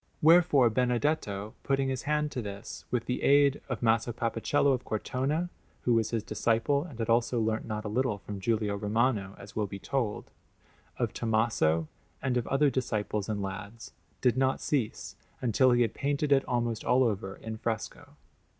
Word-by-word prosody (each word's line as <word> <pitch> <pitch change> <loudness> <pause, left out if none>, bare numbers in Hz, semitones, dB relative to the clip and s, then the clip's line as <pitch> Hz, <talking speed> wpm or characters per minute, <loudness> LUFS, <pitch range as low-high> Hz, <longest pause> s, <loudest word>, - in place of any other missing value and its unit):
Wherefore 155 -7 +5
Benedetto, 120 -4 0
putting 135 -1 0
his 130 -1 -2
hand 150 0 +1
to 125 - -3
this 100 -2 -7
with 120 -2 -1
the 125 - -2
aid 140 0 +4
of 125 -1 -3
Maso 115 +1 +2
Papacello 120 +4 +1
of 125 - -2
Cortona 140 +10 -2 0.3
(who 120 - +3
was 110 -1 +2
his 115 -2 -1
disciple 115 +7 +1
and 155 -9 -10
had 115 -2 -2
also 120 +1 +2
learnt 110 0 0
not 110 -1 -4
a - - -1
little 115 0 0
from 100 0 -7
Giulio 105 0 0
Romano, 105 -1 0
as 100 +1 -12
will 105 -2 0
be 100 - -7
told), 115 -1 -3 0.7
of - - -1
Tommaso, 110 -9 +1 0.3
and 130 -2 -1
of 120 -2 0
other 140 +1 +3
disciples 105 -4 -2
and 105 -2 -2
lads, 100 +4 -7 0.3
did 125 -1 +3
not 130 0 +2
cease 130 -8 -2 0.2
until 130 +2 +3
he 120 0 +4
had 115 - -1
painted 145 +1 -1
it 135 -1 +5
almost 120 -2 -1
all 125 +1 +4
over 100 -4 -1
in 110 -1 -7
fresco. 110 0 -4
115 Hz, 175 wpm, -29 LUFS, 110-130 Hz, 0.7 s, Wherefore